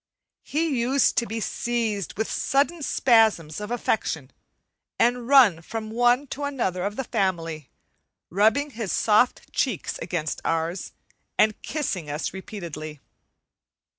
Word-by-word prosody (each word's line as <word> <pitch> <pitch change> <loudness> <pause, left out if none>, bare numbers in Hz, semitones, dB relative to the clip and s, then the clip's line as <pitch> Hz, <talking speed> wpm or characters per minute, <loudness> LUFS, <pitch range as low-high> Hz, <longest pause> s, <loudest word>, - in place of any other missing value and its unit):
He 305 -3 -1
used 260 +3 +3
to 235 - +2
be 225 +2 -3
seized 220 -4 -2
with 220 - 0
sudden 290 +5 0
spasms 220 - +3
of 210 - -5
affection 210 - -1 0.7
and 240 0 +2
run 245 -12 +6
from 220 +4 -6
one 245 +4 +3
to 290 - -6
another 210 -11 -1
of 205 +1 -3
the 265 - -2
family, 165 - -2 0.6
rubbing 220 - +3
his 220 -6 -4
soft 220 +3 +2
cheeks 245 - -1
against 165 -3 -3
ours, 165 +3 -2 0.4
and 215 -1 +3
kissing 195 - -3
us 150 +2 -3
repeatedly. 165 -6 -7
220 Hz, 125 wpm, -25 LUFS, 175-245 Hz, 0.7 s, run